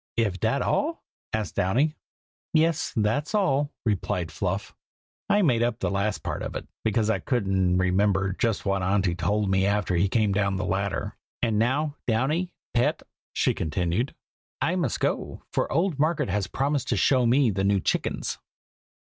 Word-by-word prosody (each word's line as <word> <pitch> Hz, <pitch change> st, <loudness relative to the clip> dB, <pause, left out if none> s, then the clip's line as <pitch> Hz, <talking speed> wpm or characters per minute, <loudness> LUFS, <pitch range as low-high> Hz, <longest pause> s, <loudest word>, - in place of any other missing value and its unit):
"Iv 105 Hz, -5 st, +1 dB
dat 115 Hz, +6 st, +1 dB
all?" 325 Hz, +3 st, 0 dB, 0.3 s
asked 110 Hz, -3 st, -2 dB
Downy. 125 Hz, -, +1 dB, 0.6 s
"Yes, 160 Hz, 0 st, +2 dB
that's 130 Hz, -, 0 dB
all," 145 Hz, -8 st, +2 dB
replied 95 Hz, -5 st, -1 dB
Fluff. 95 Hz, +4 st, -3 dB, 0.6 s
"I 205 Hz, 0 st, +4 dB
made 125 Hz, -8 st, +3 dB
up 120 Hz, -1 st, +1 dB
the -, -, -1 dB
last 100 Hz, +1 st, -1 dB
part -, -, -3 dB
of -, -, -5 dB
it, -, -, -5 dB, 0.2 s
because 110 Hz, 0 st, +2 dB
I -, -, 0 dB
couldn't 95 Hz, -7 st, +1 dB
remember 95 Hz, +1 st, +2 dB
just 115 Hz, +2 st, -1 dB
what 100 Hz, -1 st, +1 dB
Auntie 95 Hz, -1 st, +1 dB
told 95 Hz, +4 st, 0 dB
me 95 Hz, 0 st, +3 dB
after 100 Hz, -3 st, +1 dB
he 95 Hz, +3 st, +2 dB
came 110 Hz, -1 st, +2 dB
down 100 Hz, -1 st, +1 dB
the 95 Hz, 0 st, -2 dB
ladder. 95 Hz, +1 st, -2 dB, 0.3 s
And 110 Hz, -3 st, +2 dB
now, 140 Hz, +6 st, +1 dB
Downy, 145 Hz, +10 st, +1 dB, 0.2 s
pet," 120 Hz, 0 st, +1 dB, 0.3 s
she -, -, +2 dB
continued, 90 Hz, -, -1 dB, 0.4 s
"I 175 Hz, -, +1 dB
must 165 Hz, -, -1 dB
go, -, -, -2 dB
for -, -, -1 dB
old 165 Hz, -1 st, +1 dB
Margaret 155 Hz, -, +1 dB
has 100 Hz, 0 st, 0 dB
promised 140 Hz, 0 st, -1 dB
to -, -, +1 dB
show 130 Hz, -3 st, +3 dB
me 125 Hz, 0 st, +4 dB
the 95 Hz, 0 st, -1 dB
new 100 Hz, 0 st, +3 dB
chickens. -, -, -1 dB
105 Hz, 165 wpm, -26 LUFS, 95-135 Hz, 0.6 s, I